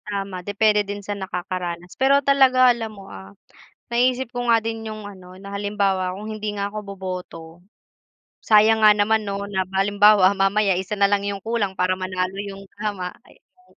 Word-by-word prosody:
Tama, 195 Hz, -3 st, -4 dB
depende 210 Hz, +2 st, +2 dB
din 205 Hz, 0 st, -6 dB
sa 205 Hz, -, -3 dB
nakakaranas. 180 Hz, -2 st, -5 dB
Pero 275 Hz, +1 st, +3 dB
talaga 255 Hz, -2 st, +5 dB
alam 225 Hz, -2 st, -6 dB
mo, 195 Hz, -, -11 dB
ah, 95 Hz, +1 st, -11 dB, 0.6 s
naisip 250 Hz, +1 st, +1 dB
ko 245 Hz, -1 st, -4 dB
nga 230 Hz, -1 st, +3 dB
din 225 Hz, 0 st, -4 dB
'yong 215 Hz, 0 st, -7 dB
ano 185 Hz, -2 st, -12 dB
na 200 Hz, +1 st, -10 dB
halimbawa 200 Hz, -2 st, -1 dB
kung 210 Hz, +3 st, -7 dB
hindi 215 Hz, -1 st, -4 dB
nga 200 Hz, 0 st, -3 dB
ako 215 Hz, -, -5 dB, 0.2 s
boboto, 185 Hz, -3 st, -7 dB, 1.0 s
sayang 220 Hz, +1 st, +4 dB
nga 210 Hz, -, +8 dB
naman 215 Hz, +1 st, +1 dB
'no 200 Hz, 0 st, -3 dB
na 190 Hz, -2 st, -1 dB
halimbawa 200 Hz, 0 st, +4 dB
mamaya 195 Hz, +1 st, +2 dB
isa 190 Hz, +2 st, -4 dB
na 200 Hz, -, +3 dB
lang 200 Hz, 0 st, +1 dB
'yong 200 Hz, -1 st, -4 dB
kulang 220 Hz, -4 st, -1 dB
para 180 Hz, 0 st, +1 dB
manalo 185 Hz, 0 st, -3 dB
'yong 195 Hz, -1 st, -8 dB, 0.2 s
tama, 200 Hz, -4 st, -3 dB, 0.2 s
ay, -, -, -20 dB
'yong 365 Hz, 0 st, -30 dB
205 Hz, 180 wpm, -22 LUFS, 190-220 Hz, 1.0 s, nga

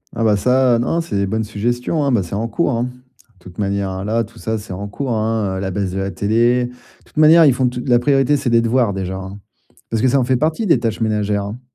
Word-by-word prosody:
Ah 115 Hz, -, -1 dB
bah 105 Hz, -2 st, +4 dB
ça, 125 Hz, +3 st, +3 dB
heu, -, -, 0 dB
non, 165 Hz, +8 st, 0 dB
c'est 165 Hz, -, -5 dB
des 100 Hz, 0 st, 0 dB
bonnes 110 Hz, +3 st, -1 dB
suggestions, 120 Hz, +8 st, -2 dB
hein, 140 Hz, -, +1 dB
bah, 105 Hz, -6 st, +2 dB
c'est 85 Hz, -, -9 dB
en 110 Hz, +3 st, -1 dB
cours, 170 Hz, +4 st, 0 dB
hein. 120 Hz, 0 st, -1 dB, 0.5 s
De -, -, -26 dB
toute 90 Hz, +1 st, -13 dB
manière, 100 Hz, -1 st, -1 dB
heu, -, -, -5 dB
là, 115 Hz, +2 st, 0 dB
tout 115 Hz, -, -14 dB
ça, 110 Hz, 0 st, -2 dB
c'est 105 Hz, -3 st, -8 dB
en 100 Hz, +2 st, -5 dB
cours, 130 Hz, +5 st, -4 dB
hein, 110 Hz, -3 st, -1 dB
heu, -, -, -3 dB
la 95 Hz, -, -2 dB
baisse 95 Hz, 0 st, -2 dB
de 95 Hz, -, -3 dB
la 95 Hz, -, -2 dB
télé. 115 Hz, +6 st, +1 dB
De 120 Hz, -, -8 dB, 0.3 s
toute -, -, -23 dB
manière, 160 Hz, +2 st, +7 dB
ils 140 Hz, -, +5 dB
font 125 Hz, 0 st, +1 dB
tout 125 Hz, 0 st, -6 dB
la 120 Hz, -2 st, +4 dB
priorité, 135 Hz, +2 st, +2 dB
c'est 130 Hz, -3 st, -1 dB
des 115 Hz, 0 st, +4 dB
devoirs 115 Hz, -2 st, +1 dB
déjà, 95 Hz, -1 st, -4 dB
hein. 95 Hz, +1 st, -8 dB, 0.5 s
Parce 115 Hz, -1 st, 0 dB
que 130 Hz, -, +3 dB
ça 135 Hz, +2 st, +3 dB
en 130 Hz, -, +2 dB
fait 130 Hz, 0 st, +1 dB
partie 160 Hz, -, 0 dB
des 165 Hz, -, +4 dB
tâches 115 Hz, -2 st, -2 dB
ménagères, 105 Hz, -2 st, 0 dB
hein, 105 Hz, +4 st, -7 dB
115 Hz, 280 wpm, -18 LUFS, 100-125 Hz, 0.5 s, manière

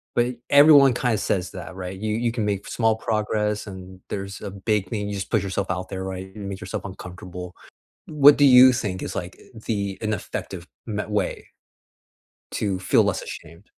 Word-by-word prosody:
but 120 Hz, +1 st, +1 dB
everyone 140 Hz, -2 st, +7 dB
kinda 120 Hz, -2 st, 0 dB
says 95 Hz, -3 st, -1 dB
that, 90 Hz, 0 st, -8 dB
right? 95 Hz, 0 st, -6 dB
You 105 Hz, +1 st, -2 dB
you 120 Hz, 0 st, 0 dB
can 115 Hz, -3 st, -2 dB
make 100 Hz, -1 st, -2 dB
small 115 Hz, -2 st, +1 dB
progress, 105 Hz, -1 st, -1 dB
and 95 Hz, -1 st, -10 dB
there's 100 Hz, 0 st, -5 dB
a 100 Hz, -, -6 dB
big 100 Hz, 0 st, -1 dB
thing. 105 Hz, -2 st, -3 dB
You 105 Hz, -, -4 dB
just 95 Hz, -, -5 dB
put -, -, +3 dB
yourself 95 Hz, 0 st, -2 dB
out 95 Hz, 0 st, -4 dB
there, 95 Hz, -1 st, -5 dB
right? 95 Hz, 0 st, -6 dB
You 105 Hz, -, -8 dB
make 100 Hz, -1 st, -5 dB
yourself 90 Hz, -, -5 dB
uncomfortable. 90 Hz, -1 st, -8 dB, 0.5 s
What 145 Hz, -1 st, +6 dB
do 145 Hz, -, +5 dB
you 130 Hz, 0 st, +9 dB
think 100 Hz, -7 st, -3 dB
is, -, -, -5 dB
like, 90 Hz, +1 st, -6 dB, 0.3 s
the 100 Hz, -3 st, -2 dB
ineffective 100 Hz, -4 st, -4 dB, 0.2 s
me 105 Hz, -2 st, -3 dB
way, 105 Hz, 0 st, -2 dB, 1.1 s
to 100 Hz, -3 st, -1 dB
feel -, -, +4 dB
less -, -, -1 dB
ashamed? 85 Hz, +5 st, -10 dB
100 Hz, 185 wpm, -23 LUFS, 95-110 Hz, 1.1 s, you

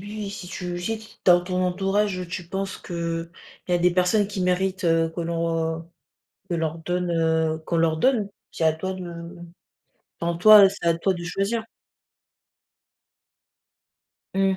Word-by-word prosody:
oui, 205 Hz, 0 st, -6 dB
si 185 Hz, -3 st, -8 dB
tu 175 Hz, -1 st, -5 dB
si 225 Hz, +5 st, -2 dB
t 220 Hz, -, -13 dB, 0.2 s
dans 175 Hz, -1 st, +6 dB
ton 185 Hz, 0 st, -1 dB
entourage, 195 Hz, +1 st, 0 dB
tu 175 Hz, -1 st, -6 dB
penses 195 Hz, +1 st, -4 dB
qu'il 170 Hz, -1 st, -4 dB, 0.4 s
y -, -, 0 dB
a -, -, +5 dB
des 180 Hz, +1 st, +4 dB
personnes 180 Hz, +3 st, +2 dB
qui 200 Hz, -1 st, -5 dB
méritent, 185 Hz, +1 st, 0 dB
heu, 165 Hz, -1 st, +3 dB
que -, -, -4 dB
l'on 165 Hz, -1 st, -2 dB, 0.6 s
que -, -, -3 dB
leur 165 Hz, -1 st, -1 dB
donne, 180 Hz, +2 st, -2 dB
heu, 160 Hz, -1 st, +1 dB
qu'on 170 Hz, -, -1 dB
leur 165 Hz, -1 st, +2 dB
donne, 230 Hz, -1 st, +2 dB, 0.2 s
c'est -, -, -3 dB
à 160 Hz, -, +4 dB
toi 190 Hz, +4 st, -4 dB
de 185 Hz, -1 st, -7 dB, 1.2 s
enfin, 170 Hz, 0 st, -1 dB
en -, -, -6 dB
toi 210 Hz, +2 st, +9 dB
c'est 200 Hz, -3 st, -8 dB
à 165 Hz, 0 st, +3 dB
toi 190 Hz, +3 st, +1 dB
de 175 Hz, -, -6 dB
choisir. 195 Hz, +6 st, -1 dB, 2.7 s
Mmh. 195 Hz, 0 st, +2 dB
180 Hz, 165 wpm, -24 LUFS, 165-195 Hz, 2.7 s, toi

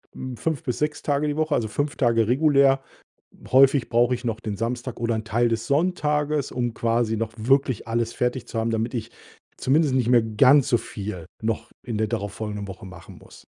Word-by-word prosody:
Mm, 130 Hz, -1 st, -6 dB
5 160 Hz, -4 st, -2 dB
bis 125 Hz, -, -3 dB
6 150 Hz, 0 st, -1 dB
Tage 145 Hz, +1 st, 0 dB
die 145 Hz, +1 st, -2 dB
Woche, 155 Hz, -2 st, +1 dB
also, 110 Hz, -, 0 dB
5 145 Hz, +6 st, -2 dB
Tage 115 Hz, -4 st, +2 dB
regulär. 135 Hz, 0 st, +4 dB, 0.7 s
Häufig 135 Hz, 0 st, +5 dB
brauche 120 Hz, +2 st, +3 dB
ich 125 Hz, -, -7 dB
noch 115 Hz, -1 st, -2 dB
den 105 Hz, -3 st, -4 dB
Samstag 120 Hz, +2 st, -4 dB
oder 115 Hz, -1 st, 0 dB
'n 110 Hz, 0 st, -3 dB
Teil 120 Hz, +3 st, +1 dB
des 115 Hz, -1 st, -2 dB
Sonntages, 150 Hz, -2 st, 0 dB
um 120 Hz, -2 st, -2 dB
quasi 115 Hz, -1 st, 0 dB
noch 110 Hz, 0 st, -3 dB
wirklich 130 Hz, 0 st, +1 dB
alles 115 Hz, 0 st, -1 dB
fertig 125 Hz, 0 st, -2 dB
zu 115 Hz, -, -5 dB
haben, 115 Hz, +1 st, 0 dB
damit 115 Hz, +2 st, -2 dB
ich 115 Hz, 0 st, -4 dB, 0.5 s
zumindest 140 Hz, 0 st, +2 dB
nicht 125 Hz, -3 st, +1 dB
mehr 120 Hz, -2 st, +5 dB
ganz 130 Hz, +5 st, +4 dB
so 120 Hz, -, +4 dB
viel 100 Hz, -6 st, -6 dB, 0.2 s
noch 115 Hz, +1 st, -2 dB
in 115 Hz, -4 st, -4 dB
der 110 Hz, -1 st, 0 dB
darauf 105 Hz, -4 st, -3 dB
folgenden 105 Hz, -2 st, -5 dB
Woche 95 Hz, 0 st, -9 dB
machen 95 Hz, -1 st, -12 dB
muss. -, -, -17 dB
120 Hz, 205 wpm, -24 LUFS, 110-135 Hz, 0.7 s, Häufig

